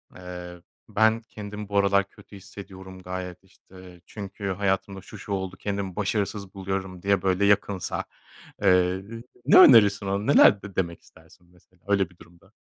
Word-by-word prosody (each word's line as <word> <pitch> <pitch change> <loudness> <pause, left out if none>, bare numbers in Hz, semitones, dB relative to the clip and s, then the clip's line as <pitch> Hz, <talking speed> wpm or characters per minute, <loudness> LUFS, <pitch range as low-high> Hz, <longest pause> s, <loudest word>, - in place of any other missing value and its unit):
eee 90 -1 -9 0.3
ben 110 +1 +2
kendimi 105 -1 -9
bu 100 - -1
aralar 100 0 +3
kötü 100 - -17
hissediyorum 95 -1 -12
gayet 90 0 -7
işte. 95 -2 -17
Çünkü 100 0 -7
hayatımda 95 0 -2
şu 105 - -12
şu 100 - -10
oldu, 95 -1 -3
kendimi 100 -3 -4
başarısız 100 -1 -2
buluyorum 95 -1 -5
diye 100 -1 +2
böyle 95 +1 +1
yakınsa, 100 -2 0 0.6
eee, - - +1
ııı, 95 +5 0 0.2
ne 145 - +6
önerirsin 105 - +7
onu? 100 +2 -2
Neler 105 -7 +6
d 100 -1 -11
demek 85 -3 -2
istersin 80 +2 -22
mesela? 90 0 -28
Öyle 100 -3 +1
bir 90 - -23
durumda. 85 0 -20
95 Hz, 155 wpm, -25 LUFS, 90-100 Hz, 0.6 s, önerirsin